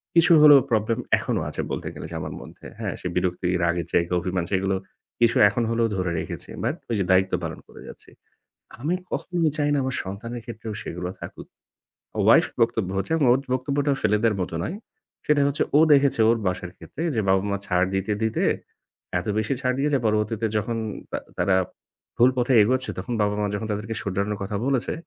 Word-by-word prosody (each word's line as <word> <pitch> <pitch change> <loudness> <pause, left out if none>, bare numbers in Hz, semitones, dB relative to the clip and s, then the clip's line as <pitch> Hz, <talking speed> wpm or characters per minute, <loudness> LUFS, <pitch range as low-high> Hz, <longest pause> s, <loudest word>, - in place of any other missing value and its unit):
কিছু 170 0 +5
হলেও 145 -2 +9
problem 110 +1 +1 0.2
এখনও - - -1
আছে - - -3
বলতে - - -4
গেলে - - -7
যে - - -6
আমার - - -5
মধ্যে, - - -13
হ্যাঁ? - - -2
সে - - -3
বিরক্তি, 90 0 0
রাগের 85 0 0
জায়গা, 85 0 +2
অভিমান 90 0 -2
সেইগুলো 95 0 +1 0.4
কিছু 115 -1 +3
এখন 110 +4 -1
হলেও 115 0 +2
ধরে 90 -2 -1
রেখেছি, - - -6
but 120 +7 0
ওই 115 - 0
যে - - +2
দায়িত্ব 95 0 +3
পালন 80 -1 -5
করে - - -14
যাচ্ছি। - - -13 0.7
আমি 155 +7 0 0.2
কখনোই 170 -4 0
চাই 145 -1 +1
না - - +2
আমার 130 0 -2
সন্তানের 115 +5 -6
ক্ষেত্রেও 110 -2 -6
সেগুলো 90 -5 -5
থাকুক। - - -9 0.8
wife - - +6
বক্তব্য 115 -4 +1
হচ্ছে 100 - -2
এবং 155 -4 +2
ওর 130 - +2
বক্তব্যটাও 140 +2 0
ফেলে 105 0 +3
দেওয়ার 110 -3 +2
মতো 90 - -3
নয়। 175 - -3 0.5
সেটা 150 -1 +3
হচ্ছে 140 +1 0
ও - - +7
দেখেছে 140 -3 +3
ওর 115 - +4
বাসার 90 -1 -3
ক্ষেত্রে 155 - -9
যে, 110 - +2
বাবা-মা 100 +1 +2
ছাড় 90 -2 +2
দিতে, 95 +2 0
দিতে 110 - 0 0.8
এত 90 - -7
বেশি 110 +4 0
ছাড় 125 -1 +1
দিয়েছে 145 0 +2
পরবর্তীতে 110 +1 0
যখন 115 +2 -2 0.3
তা - - -1 0.2
তারা 95 - +2 0.6
ভুল 120 +2 +6
পথে 125 +1 +2
এগোচ্ছে 130 +4 +1
তখন 125 - -4
বাবা-মা 105 0 0
যখন 110 +2 -4
তাদেরকে 105 +2 -3
শুধরানোর 100 +1 -2
কথা 100 +2 -4
বলেছে, 135 -3 0
110 Hz, 185 wpm, -24 LUFS, 95-130 Hz, 0.8 s, হলেও